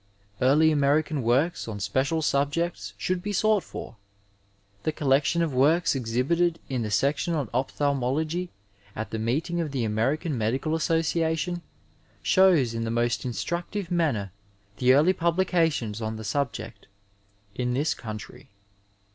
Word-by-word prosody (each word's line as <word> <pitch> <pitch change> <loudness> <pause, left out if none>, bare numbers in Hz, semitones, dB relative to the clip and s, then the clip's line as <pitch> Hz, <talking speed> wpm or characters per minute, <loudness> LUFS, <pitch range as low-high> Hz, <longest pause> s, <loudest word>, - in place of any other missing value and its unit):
Eaiiy 150 +5 +5
American 150 +1 +2
works 130 +9 +1
on 105 -2 -5
special 140 +10 0
subjects 145 - -1
should 180 - -1
be 205 - -3
sought 215 0 +3
for. 115 - -9 0.8
The 155 - 0
collection 145 +3 +2
of 160 -4 -2
works 150 +7 +3
exhibited 140 +8 +1
in 130 -3 -1
the 110 - -2
section 140 - +1
on 135 -9 -2
ophthalmology 145 +6 -1 0.5
at 110 - -5
the 110 - -3
meeting 155 +10 -1
.of 160 - -2
the 135 -4 -2
American 135 - 0
Medical 125 +7 -1
Association 165 +1 0 0.6
shows 175 - +4
in 115 0 -2
the 115 - -2
most 120 +1 0
instructive 170 - -3
manner 140 - 0 0.5
the 125 - -2
eariy 150 +8 +5
publications 165 - +1
on 110 0 -3
the 110 - -7
subject 115 -1 -3 0.7
in 125 +2 -1
this 145 +4 +1
country. 110 -2 -9
145 Hz, 135 wpm, -26 LUFS, 120-165 Hz, 0.8 s, Eaiiy